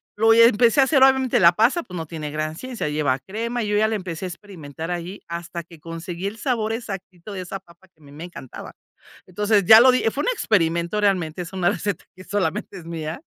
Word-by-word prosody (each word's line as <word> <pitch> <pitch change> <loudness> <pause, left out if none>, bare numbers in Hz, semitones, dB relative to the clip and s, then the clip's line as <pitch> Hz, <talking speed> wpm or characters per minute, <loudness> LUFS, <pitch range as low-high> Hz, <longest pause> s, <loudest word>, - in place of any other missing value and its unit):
lo 225 +2 +5
hi 230 - +6
empecé 230 +3 +5
a - - +7
hacer. 270 0 +2
Obviamente, 265 -1 +4
la 170 -2 +6
pasta, 240 - +2
pues, 180 - -11
no 165 -2 -4
tiene 155 -2 -6
gran 155 +1 -3
ciencia, 245 -4 -5
lleva 150 -3 0
crema, 230 - -4
yo 210 -1 0
ya 215 +1 +3
la 220 - -1
empecé 185 -3 -5
a - - -2
experimentar 170 -4 -8
ahí, 175 +3 -5
hasta 170 0 -6
que 165 -1 -16
conseguí 170 +3 -6
el 210 +2 -6
sabor 225 -2 -1
exactito 195 -4 -7
de 195 -2 -5
esa 185 +2 -6
papa 175 0 -22
que 160 -3 -32
a - - -20
mí 140 - -15
me 155 +4 -8
encantaba. 155 -8 -10 0.5
Entonces, 205 +2 +1
ya 220 +4 +10
lo 255 +2 +7
di 255 - +1
fue 285 - -3
un - - -2
experimento 170 - 0
realmente, 185 -5 0
es 170 - -11
una 180 -2 +1
receta 205 +3 -3
que 185 - -12
solamente 200 -2 -2
es 175 - -11
mía. 165 - -5
185 Hz, 230 wpm, -22 LUFS, 165-220 Hz, 0.5 s, ya